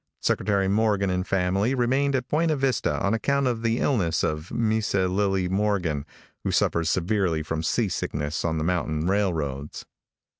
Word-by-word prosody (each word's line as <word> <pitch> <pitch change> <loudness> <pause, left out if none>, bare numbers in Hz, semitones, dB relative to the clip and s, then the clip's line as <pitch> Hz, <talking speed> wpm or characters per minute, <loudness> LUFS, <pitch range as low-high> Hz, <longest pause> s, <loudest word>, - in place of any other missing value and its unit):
Secretary 100 -2 +1
Morgan 100 -1 +2
and 90 0 -2
family 95 +6 +1
remained 135 +3 +1
at 130 -1 -2
Buena 155 +2 +1
Vista 135 -5 0
on 100 - +2
account 140 +5 +1
of 120 -3 0
the 115 0 +1
illness 90 - +1
of 75 +2 -2
Misa 110 -4 +1
Lillie 95 -1 0
Morgan, 95 -7 0 0.4
who - - -1
suffers 85 -1 +1
severely 90 -3 0
from 80 +1 -3
sea 105 +7 +1
sickness 75 -4 -3
on 80 -1 0
the 75 - -1
mountain 80 -2 -1
railroads. 80 -8 -1
95 Hz, 155 wpm, -25 LUFS, 85-115 Hz, 0.4 s, Morgan